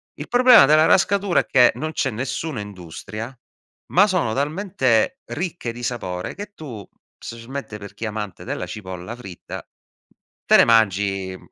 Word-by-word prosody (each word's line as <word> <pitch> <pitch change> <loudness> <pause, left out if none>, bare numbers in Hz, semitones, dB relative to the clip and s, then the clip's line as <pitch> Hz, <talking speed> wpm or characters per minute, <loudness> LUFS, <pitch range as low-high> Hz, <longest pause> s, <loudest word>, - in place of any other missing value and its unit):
Il - - -8
problema 245 - +7
della 155 +3 +5
Rascatura 195 0 +3
è - - -12
che 125 -2 +5
non 155 0 -4
c'è - - 0
nessuna 130 +4 -4
industria, 105 +5 -8 0.6
ma 195 +3 +7
sono 180 - 0
talmente 150 - 0
ricche 175 -9 -4
di 120 +1 -9
sapore 95 -7 -4
che 205 0 -8
tu, 120 -10 -8 0.3
specialmente 115 0 -7
per 100 -1 -11
chi 105 - -9
è - - -1
amante 105 -4 -6
della - - -4
cipolla 95 +1 -7
fritta, 95 -8 -9 0.8
te - - +5
ne - - +7
mangi 100 -4 +2
120 Hz, 150 wpm, -22 LUFS, 105-160 Hz, 0.8 s, problema